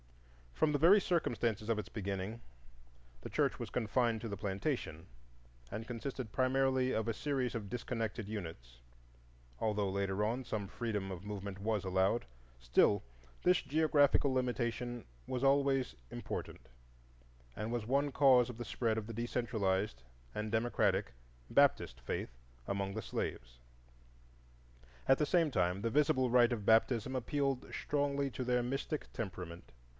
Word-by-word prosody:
From 155 - +3
the 145 - +1
very 190 +7 +7
circumstances 120 - 0
of 115 -2 +2
its 100 - -6
beginning, 100 +2 -4 0.8
the - - -7
church - - +1
was - - -5
confined 115 -1 +1
to 115 - -4
the 100 -2 -4
plantation, 95 - -3 0.6
and 110 +2 -5
consisted 125 -1 -5
primarily 130 0 +2
of 110 +1 -1
a 115 - +1
series 130 -3 -1
of 105 -3 -4
disconnected 115 -2 -3
units; 80 - -7 0.8
although, 105 -2 0
later 100 +1 0
on, 120 +5 -1
some 105 -4 -3
freedom 105 -3 -3
of 90 -1 -6
movement 100 -1 -5
was 105 -1 0
allowed, 95 +4 +1 0.3
still 60 +12 +3 0.4
this 180 0 +4
geographical 145 -2 +3
limitation 120 -1 -1 0.2
was 125 0 -2
always 135 - +3 0.2
important - - -6 0.9
and 105 +2 -3
was 120 -3 -2
one 140 +3 +2
cause 130 -4 +6
of 120 - -7
the 120 - -5
spread 110 0 0
of 105 - -8
the 115 - -6
decentralized 105 - -1 0.3
and 105 0 -3
democratic 110 -4 +1 0.4
Baptist 65 0 +3
faith - - -4 0.3
among 100 0 -2
the 110 0 -4
slaves. - - -4 1.5
At 135 - +5
the 150 - +2
same 165 -1 +3
time, 90 -5 +1
the 115 +1 -1
visible 140 -2 +3
rite 120 0 +5
of 105 -4 -4
baptism 115 +3 +3
appealed 135 +1 -1
strongly 140 -1 0
to 130 - -4
their 125 0 +2
mystic 135 +4 -3
temperament. 90 -5 -6
115 Hz, 140 wpm, -34 LUFS, 100-130 Hz, 1.5 s, very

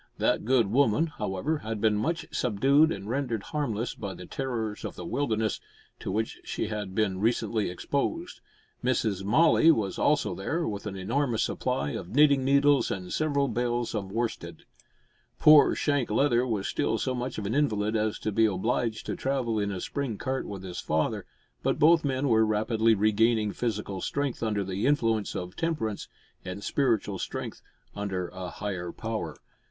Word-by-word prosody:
That - - +1
good 125 -1 +4
woman, 125 +6 +3
however, 145 - -2
had 110 -3 -4
been 110 0 +3
much 160 +11 -1
subdued 135 +8 +3
and 100 - -5
rendered 120 -3 -2
harmless 120 -7 -2
by 100 -3 -6
the 90 - -9
terrors 115 -5 -3
of - - -5
the 90 - -7
wilderness, 110 -1 -1 0.4
to - - -4
which 110 +3 -2
she - - -3
had 105 -3 -4
been 100 -4 +1
recently 110 -1 0
exposed. 145 - -3 0.4
Miss 125 -1 +1 0.2
Molloy 160 +9 +5
was 100 -8 -2
also 140 -10 +2
there, 155 - -2
with 105 0 -4
an 100 - -5
enormous 115 +5 0
supply 70 +1 -1
of 85 - -5
knitting 145 -2 +5
needles 140 +1 +4
and 90 -2 -4
several 140 -3 +1
bales 120 -1 -1
of 100 -3 -3
worsted. 115 +2 -4 0.7
Poor 150 -1 +7
Shank 145 -4 0
Leather 125 +2 +2
was 105 -5 -1
still 115 - 0
so 130 +3 -1
much 125 0 -4
of 105 - -4
an 105 - -1
invalid 110 -7 +1
as 110 0 0
to 110 - -1
be 110 +2 +4
obliged 110 +3 -1
to - - -3
travel 130 -5 -1
in 100 -1 -1
a 95 - -4
spring 135 0 -3
cart 130 +4 -3
with 100 -2 -7
his 90 -2 -6
father, 80 0 -1 0.3
but - - 0
both 165 +2 +5
men 135 0 0
were 110 -3 +4
rapidly 110 +1 +2
regaining 110 +1 +2
physical 105 -4 -3
strength 140 -3 -2
under 105 -3 0
the 95 +5 -1
influence 115 -7 +1
of 90 0 -5
temperance, 130 -11 -2 0.4
and 90 +2 -6
spiritual 115 -8 0
strength - - -5 0.3
under 95 -3 -3
a 95 -1 -6
higher 90 -3 -4
power. 110 -1 -4
110 Hz, 170 wpm, -28 LUFS, 100-135 Hz, 0.7 s, Poor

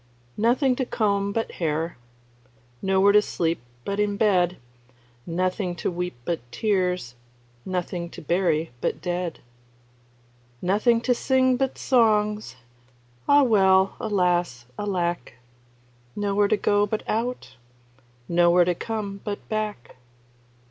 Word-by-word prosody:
Nothing 250 +4 +3
to 260 - 0
comb 200 -3 0
but 225 +2 -2
hair, 165 0 -2 0.9
Nowhere 195 +1 +4
to 210 +1 +6
sleep 165 - -2 0.2
but 200 +1 -2
in 205 -1 0
bed, 180 -5 +2 0.7
Nothing 180 +2 -1
to 175 - -2
weep 180 -2 -4
but 170 -2 -1
tears, 180 - 0 0.5
Nothing 180 -1 -3
to - - -10
bury 165 -2 +1
but - - -1
dead. 175 -2 -3 1.2
Nothing 210 - +2
to 250 +1 +2
sing 260 +1 +2
but 265 +1 -1
songs, 215 - +2 0.7
Ah, 285 0 +7
well, 190 -5 +4
alas! 180 - 0
alack! 175 -6 -2 0.8
Nowhere 205 0 +1
to 215 - +2
go 205 0 +2
but 215 +1 -3
out, 235 - -3 0.7
Nowhere 175 0 +4
to 180 - +1
come 200 0 -5
but 205 -1 -5
back. 210 - -4
195 Hz, 115 wpm, -24 LUFS, 175-215 Hz, 1.2 s, Ah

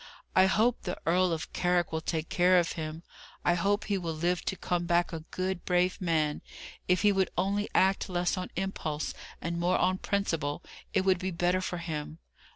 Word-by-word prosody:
I 185 - +6
hope 225 +5 +2
the 180 - -4
Earl 180 +2 +3
of 160 -1 -4
Carrick 180 -1 +1
will 160 0 -2
take 160 0 -2
care 180 +1 +4
of 175 -1 +2
him. 160 0 -5 0.4
I 175 - +4
hope 200 +4 +1
he 200 -2 -1
will 165 -3 -3
live 175 +3 0
to - - -1
come 175 -1 -2
back 175 +1 +2
a 165 - -3
good, 185 -1 -2
brave 180 +1 +1
man! 155 -4 +1 0.5
If 180 +1 +2
he 205 - +6
would 190 -1 +1
only 200 +3 0
act 190 +1 +3
less 175 -1 0
on 185 -1 -4
impulse 165 -5 -3 0.3
and 170 +1 -2
more 175 +2 +2
on 185 +1 +1
principle, 165 -6 -1 0.3
it 190 - +2
would 190 -2 +3
be 190 0 -2
better 175 +1 +1
for 180 -1 -3
him. 155 -2 -5
180 Hz, 195 wpm, -29 LUFS, 170-185 Hz, 0.5 s, I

